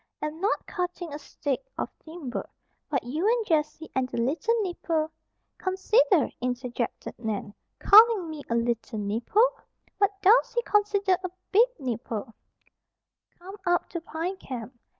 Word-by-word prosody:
Am 305 +2 -4
not 410 - 0
cutting 355 -4 -4
a 295 - -5
stick 285 - -3
of - - -1 0.2
timber. 315 -6 -6 0.4
But 275 -4 0
you 305 - -1
and 465 0 +2
Jessie 315 -2 0
and 260 -1 0
the - - -5
little 320 - +1
nipper," 325 -4 -1 0.5
("Consider!" 380 - +3
interjected 245 -1 -3
Nan, 215 -3 -3 0.2
"calling 430 -3 +7
me 310 -2 -6
'a 235 - +1
little 235 -1 -1
nipper'! 240 - +1 0.4
What 400 -1 +2
does 475 +5 +5
he 480 - +2
consider 405 -3 +2
a 370 - -2 0.2
big 450 +5 +6
'nipper'?") 230 - -4 1.0
"come 380 +4 -10
up 350 0 +2
to 340 - -4
Pine 335 +4 -4
Camp. 250 - -7
325 Hz, 140 wpm, -27 LUFS, 250-400 Hz, 1.0 s, calling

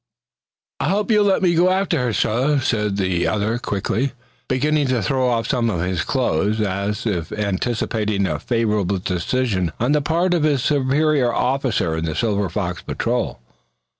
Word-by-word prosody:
"I - - 0
hope 210 +4 0
you'll 210 -1 +4
let 195 -1 +2
me 175 -2 +4
go 175 +2 +4
after 185 -4 +1
her, 125 -1 0
suh," 130 +7 +1
said 105 -6 0
the 95 -3 0
other, 110 +3 0
quickly, 120 +5 -2 0.3
beginning 145 +2 +1
to 125 -4 0
throw 130 +5 +1
off 115 -2 0
some 120 -4 +1
of 90 -6 -1
his 90 -1 -1
clothes, 110 - 0
as 100 +1 -2
if 90 -6 -2
anticipating 105 0 -1
a 75 -5 -2
favorable 105 -4 0
decision 95 0 -1
on 120 +5 +1
the 150 0 +3
part 170 +5 +1
of 175 - +1
his 145 -4 +2
superior 145 -2 +2
officer 125 - 0
in 80 0 -2
the 80 -2 -3
Silver 100 -4 0
Fox 90 -1 -3
Patrol. - - -2
115 Hz, 165 wpm, -21 LUFS, 100-140 Hz, 0.3 s, you'll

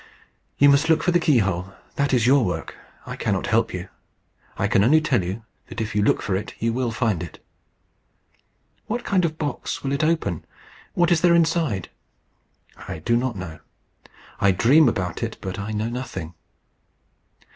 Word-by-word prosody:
"You 145 - +6
must 140 +3 +4
look 160 -1 +3
for 180 - +2
the 175 - +3
key 150 -7 +3
hole. 95 -2 -1 0.2
That 140 0 0
is 120 -3 +3
your 135 +1 +5
work. 90 -5 -3 0.3
I - - -6
cannot - - -1
help - - +1
you. - - -5 0.7
I - - +1
can 100 - +3
only 150 +8 +5
tell 140 -10 +1
you 95 +6 -5 0.2
that - - -7
if 110 -1 -3
you 105 - +1
look 100 - +2
for 95 - -1
it 105 +3 -5
you 115 0 -1
will 125 0 -1
find 110 -6 0
it." - - -8 1.5
"What 240 +2 -2
kind 185 -3 +2
of 155 -1 -3
box 150 -3 -4
will 135 - -2
it 140 +2 0
open? 155 - 0 0.5
What 175 0 +3
is 165 -2 +3
there 175 -1 +5
inside?" 160 - +1 1.0
"I - - -5
do 100 +9 0
not 120 0 0
know. 85 -4 -7 0.8
I 100 - +4
dream 130 - +5
about 90 -6 -3
it, - - -3
but 95 0 -5
I 105 +2 -4
know 110 +1 -1
nothing." 115 -9 -6
120 Hz, 180 wpm, -23 LUFS, 100-155 Hz, 1.5 s, You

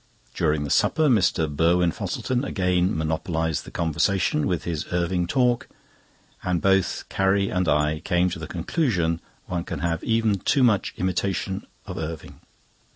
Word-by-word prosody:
During 75 -2 +1
the 70 - -4
supper 155 -1 +3
Mr. 90 -8 +3
Burwin 85 +4 +2
Fosselton 125 +8 -2
again 90 - +1
monopolised 80 0 -1
the - - -9
conversation 85 0 +1
with 85 -4 -1
his 80 -3 -3
Irving 90 0 0
talk, 125 +3 +1 0.7
and 90 -2 0
both 95 +1 +2
Carrie 100 0 +1
and 90 -1 0
I 75 +1 +2
came 90 0 +1
to 95 - -5
the - - -6
conclusion 85 - 0 0.2
one 85 -1 -3
can - - -5
have 85 -1 -1
even 115 -3 +1
too 135 +8 +2
much 105 -6 +2
imitation 95 +2 -2 0.2
of 95 -3 -6
Irving. 80 -3 -6
90 Hz, 150 wpm, -24 LUFS, 80-100 Hz, 0.7 s, supper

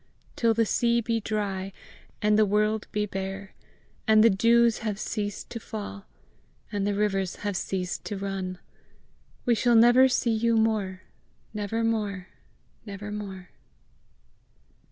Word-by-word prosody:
Till 230 -1 +2
the 230 0 +3
sea 235 +2 +2
be 230 0 0
dry, 200 -3 -3 0.5
and 210 0 +4
the 215 - +5
world 210 +1 +1
be 210 0 0
bare, 195 0 -5 0.5
And 215 0 +6
the 230 - +6
dews 230 +3 +4
have 215 -3 -3
ceased 205 -1 -4
to 230 - -5
fall, 205 -2 -7 0.6
And 205 -2 -1
the 205 - 0
rivers 195 -3 0
have 205 -2 -1
ceased 185 0 -3
to 205 - -4
run, 190 -2 -4 0.9
We 240 - +4
shall 240 +1 +3
never 240 +3 +7
see 245 -2 +1
you 230 +1 +2
more, 210 -4 0 0.5
Never 215 +2 -2
more, 205 -5 -1 0.5
never 205 -1 -7
more! 195 -3 -7
210 Hz, 135 wpm, -27 LUFS, 195-225 Hz, 0.9 s, never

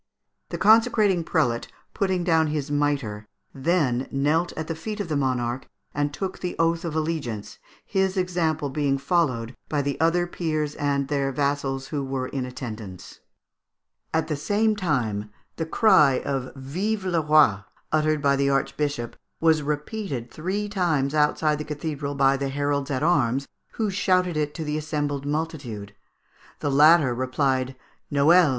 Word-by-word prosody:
The - - -4
consecrating 215 -5 +4
prelate, 125 -9 0 0.3
putting 190 -3 0
down 160 -2 +3
his 150 -1 -3
mitre, 140 -8 -1 0.3
then 135 -4 +1
knelt 155 +5 +1
at 160 - -2
the 165 - -3
feet 210 +7 -6
of 205 - -3
the 155 - 0
monarch 130 -2 -1 0.3
and 145 0 0
took 190 +5 -4
the 180 - -4
oath 165 +1 +1
of 165 -3 -4
allegiance, 155 -10 -3 0.3
his 190 -1 0
example 165 -5 0
being 140 -1 +1
followed 135 -6 0
by 145 -2 0
the 140 0 -2
other 165 +2 +3
peers 155 -4 -2
and 140 -1 0
their 140 -1 0
vassals 135 -1 -1
who 145 -3 -2
were 135 -1 -3
in 130 -2 -3
attendance. 110 -7 -8 0.9
At 160 0 0
the 155 - -1
same 210 +8 +1
time, 120 - -1 0.3
the 160 - -2
cry 155 - +5
of 135 -2 -2
"Vive 185 +10 -2
le 175 -3 +1
Roi!" 150 -10 +5 0.3
uttered 155 -1 +1
by 140 -1 +4
the 140 0 +1
archbishop, 140 -2 -1 0.2
was 160 -1 +4
repeated 150 - -4
three 190 +6 -2
times 165 -9 0
outside 150 0 +2
the - - -3
cathedral 150 -1 -4
by 135 0 +3
the 140 0 -2
heralds 145 0 -1
at 135 0 -1
arms, 140 -5 +2 0.3
who 215 -3 -1
shouted 185 -2 +1
it 150 -1 -1
to 165 - -4
the 150 0 -2
assembled 145 -2 -2
multitude. 145 -10 -4 0.7
The 145 - -1
latter 150 -1 +6
replied, 130 +1 0 0.4
"_Noel! 155 +4 +5
150 Hz, 155 wpm, -25 LUFS, 135-165 Hz, 0.9 s, latter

